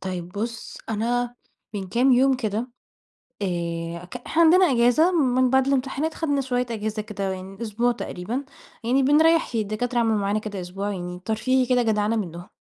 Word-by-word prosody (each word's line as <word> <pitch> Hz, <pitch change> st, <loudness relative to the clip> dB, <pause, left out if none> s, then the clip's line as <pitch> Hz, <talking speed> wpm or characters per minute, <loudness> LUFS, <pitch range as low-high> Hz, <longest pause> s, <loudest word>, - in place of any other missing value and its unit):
طيب 180 Hz, -2 st, -4 dB
بُص 225 Hz, +4 st, -5 dB
أنا 240 Hz, +3 st, -1 dB, 0.4 s
من 190 Hz, -2 st, -4 dB
كام 250 Hz, +5 st, +3 dB
يوم 265 Hz, +2 st, +4 dB
كده 215 Hz, -4 st, -2 dB, 0.8 s
آآ 170 Hz, -2 st, -3 dB
ك 250 Hz, -, -7 dB
إحنا 320 Hz, +7 st, 0 dB
عندنا 365 Hz, +3 st, +6 dB
إجازة 245 Hz, +8 st, +4 dB
من 255 Hz, -6 st, +3 dB
بعد 265 Hz, +1 st, +3 dB
الامتحانات 275 Hz, +3 st, 0 dB
خدنا 285 Hz, -4 st, 0 dB
شوية 250 Hz, -1 st, -1 dB
إجازة 215 Hz, -1 st, -3 dB
كده 210 Hz, -2 st, -6 dB
يعني 190 Hz, +2 st, -8 dB
أسبوع 235 Hz, +2 st, +1 dB
تقريبًا، 235 Hz, +6 st, -4 dB, 0.4 s
يعني 260 Hz, +4 st, +2 dB
بنريح 320 Hz, +3 st, +4 dB
الدكاترة 225 Hz, +3 st, -1 dB
عملوا 225 Hz, -2 st, +2 dB
معانا 200 Hz, +1 st, 0 dB
كده 205 Hz, -3 st, -5 dB
أسبوع 195 Hz, +3 st, -4 dB
يعني 180 Hz, -1 st, -5 dB
ترفيهي 255 Hz, +4 st, +1 dB
كده 250 Hz, 0 st, +2 dB
جدعنة 215 Hz, 0 st, +1 dB
منهم 175 Hz, -4 st, -5 dB
230 Hz, 160 wpm, -24 LUFS, 200-260 Hz, 0.8 s, عندنا